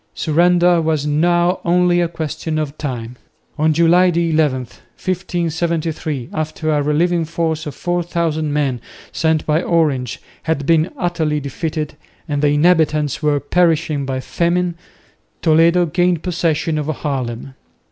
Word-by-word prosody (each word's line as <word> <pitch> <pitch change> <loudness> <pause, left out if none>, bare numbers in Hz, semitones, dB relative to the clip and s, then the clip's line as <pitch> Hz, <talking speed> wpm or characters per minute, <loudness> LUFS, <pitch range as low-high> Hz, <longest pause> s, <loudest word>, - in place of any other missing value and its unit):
Surrender 175 +2 +3
was 155 -2 0
now 175 +4 +2
only 175 0 +3
a 170 - +1
question 160 -1 -4
of 150 -2 -3
time. 125 -4 -5 0.4
On 155 +1 +3
July 170 +3 +4
11,1573, 160 0 -2
after 155 0 -2
a 150 -1 +2
relieving 165 +4 +1
force 160 -1 -2
of 145 - -6
4000 170 -3 -1
men, 140 -4 -1 0.3
sent 160 -1 0
by 155 +2 +2
Orange, 145 -9 0 0.2
had 160 -3 -2
been 165 +2 +3
utterly 160 - -1
defeated, 150 +2 -4 0.3
and 145 -2 -1
the 150 - +3
inhabitants 150 -2 +2
were 150 -2 +2
perishing 160 -1 +1
by 130 -1 -2
famine, 175 +5 0 0.7
Toledo 170 +2 +4
gained 175 0 +1
possession 165 -3 0
of 150 - -3
Haarlem. 135 -5 -4
160 Hz, 125 wpm, -18 LUFS, 150-170 Hz, 0.7 s, July